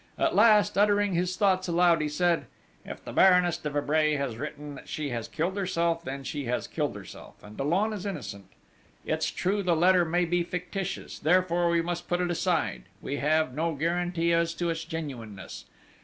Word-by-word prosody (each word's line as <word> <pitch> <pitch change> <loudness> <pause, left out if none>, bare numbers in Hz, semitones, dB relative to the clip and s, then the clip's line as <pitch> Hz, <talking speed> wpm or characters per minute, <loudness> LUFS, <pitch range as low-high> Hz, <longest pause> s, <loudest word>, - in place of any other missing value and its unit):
At - - +1
last, 210 -3 +5
uttering 205 -1 +3
his 180 +1 0
thoughts 190 -2 +2
aloud, 170 -1 +3
he 150 - -1
said: 170 +2 +1 0.4
"If - - -9
the - - -7
Baroness 180 -2 +5
de 150 - -3
Vibray 150 +1 +1
has 140 -5 -2
written 150 +2 -6
that 135 - -12
she 150 -2 -3
has 115 -3 -4
killed 175 +4 -2
herself, 170 -4 0
then 135 -2 -5
she 145 +1 -4
has 125 +1 -1
killed - - -2
herself, - - -11
and 105 +1 -12
Dollon 180 - 0
is 200 -4 -5
innocent. 120 - -6 0.6
It's 155 0 0
true 200 +3 -1
the 180 -3 +2
letter 180 +2 +4
may 175 +2 +1
be 175 +1 +1
fictitious... 180 +2 -5
therefore 175 +1 +2
we 170 0 +2
must 175 0 -4
put 175 - 0
it 180 -1 0
aside 175 0 -1
we 140 - -4
have 155 -1 +1
no 160 +3 -1
guarantee 170 +2 0
as 170 0 +1
to 170 -1 -1
its 165 0 -4
genuineness.... 115 -12 -7
170 Hz, 185 wpm, -27 LUFS, 150-180 Hz, 0.6 s, last